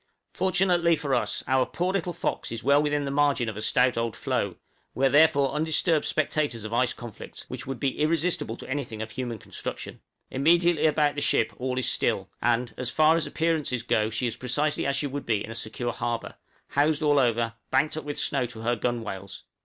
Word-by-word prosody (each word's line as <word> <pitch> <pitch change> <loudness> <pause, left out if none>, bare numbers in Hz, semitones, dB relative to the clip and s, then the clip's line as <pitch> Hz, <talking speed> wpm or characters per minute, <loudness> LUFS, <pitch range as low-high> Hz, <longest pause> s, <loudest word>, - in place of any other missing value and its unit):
Fortunately 180 -3 +2
for 145 -3 -2
us, 125 - 0
our 130 0 +3
poor 180 +7 -2
little 180 -2 -1
'Fox' - - -3
is 115 0 -5
well 140 +2 +5
within 145 -1 0
the 140 - -3
margin 140 -3 +2
of 110 - -4
a 110 - -5
stout 125 +2 +2
old 115 -1 -2
floe: - - -1 0.4
we 130 +4 +2
are - - +5
therefore 145 -1 +4
undisturbed 160 +1 +1
spectators 145 -6 -1
of 110 +1 -5
ice 125 +1 +2
conflicts, 120 -5 -9
which - - -6
would 135 -3 -4
be 135 0 -1
irresistible 155 -6 0
to - - -8
anything 130 -5 -4
of 110 - -9
human 120 -1 -4
construction. - - -7 0.3
Immediately 165 +3 +3
about 150 -1 +2
the 145 - -4
ship 115 - +2
all 130 0 -2
is 130 - 0
still, - - 0
and, 120 0 +1
as 125 -1 0
far 155 +4 +4
as 165 - 0
appearances 155 -7 0
go 110 -2 +1
she 115 +3 -2
is 115 - -2
precisely 145 +4 -1
as 140 - +1
she 140 - 0
would 140 0 -5
be 110 -3 +1
in 110 - -9
a - - -5
secure 120 +2 -3
harbor 120 -1 -3 0.4
housed 150 +2 +2
all 145 -1 +4
over, 115 -2 +1 0.2
banked 140 +4 +2
up 155 - -4
with 145 0 -5
snow 135 -4 +1
to 115 -2 -9
her 120 +2 +1
gunwales. 110 -5 -4
135 Hz, 210 wpm, -26 LUFS, 120-155 Hz, 0.4 s, well